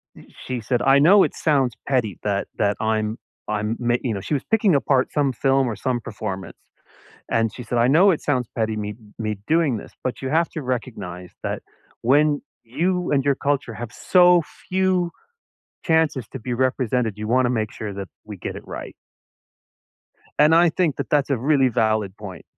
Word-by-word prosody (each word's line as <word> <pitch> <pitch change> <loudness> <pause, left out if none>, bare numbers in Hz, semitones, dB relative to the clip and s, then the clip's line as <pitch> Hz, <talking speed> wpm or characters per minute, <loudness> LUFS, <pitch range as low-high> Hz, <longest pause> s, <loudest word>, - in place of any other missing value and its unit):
y - - -15 0.2
she 125 -2 -3
said, 120 +2 0
"I 135 +1 +5
know 190 +7 +7
it - - -1
sounds 135 -7 +1 0.2
petty 120 -8 0
that 100 -1 -1
that 105 -1 +1
I'm 110 0 0 0.3
I'm 105 +1 -1
ma" 120 0 +1
you 120 -4 -1
know, 100 - -4
she 145 - -2
was 135 - -2
picking 210 -6 +4
apart 135 -1 +2
some 140 -3 +1
film 135 +1 +2
or 115 - -2
some 125 +3 -1
performance. 100 -3 -6 0.7
And 115 -2 +1
she 125 - -7
said, 120 +1 -3
"I 120 +1 +4
know 175 +8 +6
it 165 - 0
sounds 125 -5 0
petty 110 -1 0
me 105 0 -4 0.2
me 110 -2 -2
doing 155 -6 +2
this, - - -11
but 130 - -3
you 130 - -2
have 165 +2 +2
to 155 - -5
recognize 100 -9 -5
that - - -3 0.4
when 145 +4 +3 0.3
you 180 +7 0
and 140 -1 +2
your 140 -1 +2
culture 140 -5 -1
have 115 0 -7
so 180 -2 +5 0.3
few 185 -2 +1 0.7
chances 160 - +2
to 135 - -7
be 120 +2 -3
represented, 125 -4 0
you 105 - -4
wanna 125 +1 +3
make 110 -3 -1
sure 105 -2 -6
that 100 -1 -6 0.2
we 105 -2 -8
get - - -5
it - - -10
right." - - -7 1.5
And 150 +2 +6
I 170 0 +5
think 160 -4 0
that - - -5
that's 145 -1 +2
a 135 - +2
really 135 +1 +3
valid 110 -4 0
point. 95 -5 -9
125 Hz, 190 wpm, -22 LUFS, 110-150 Hz, 1.5 s, know